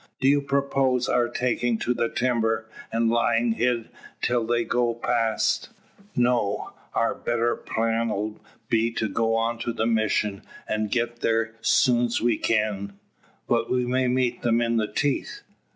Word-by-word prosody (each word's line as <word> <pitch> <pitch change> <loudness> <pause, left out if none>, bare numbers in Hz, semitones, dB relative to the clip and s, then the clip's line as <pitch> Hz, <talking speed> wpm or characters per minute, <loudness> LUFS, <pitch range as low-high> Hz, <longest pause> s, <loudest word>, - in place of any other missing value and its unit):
"Do 130 - +2
you 145 +1 +4
propose 135 -2 +1
our 120 -1 +2
taking 120 -1 0
to 125 - 0
the 115 -1 0
timber, 115 -3 0 0.2
and 115 0 +1
lying 115 0 +2
hid 120 0 0 0.3
till 120 -2 0
they 120 0 +1
go 120 -1 0
past?" 115 -2 0 0.5
"No. 120 -4 +1 0.2
Our - - +2
better 120 0 0
plan 115 +1 -1
'll 105 +1 -3 0.3
be 115 0 +2
to 110 - -1
go 115 +2 0
on 115 +1 0
to 120 0 -2
the 110 -1 -1
Mission, 110 -2 +1 0.3
an' 110 0 -1
get 120 +2 -1
thar 115 0 +1
soon's 120 -2 +3
we 120 -2 +1
kin." 105 -3 0 0.5
"But 115 -1 +1
we 125 -1 +1
may 130 +1 +1
meet 125 -1 0
them 115 -1 +2
in 115 -1 +1
the 110 -1 -1
teeth?" 145 -2 -1
115 Hz, 155 wpm, -25 LUFS, 115-120 Hz, 0.5 s, you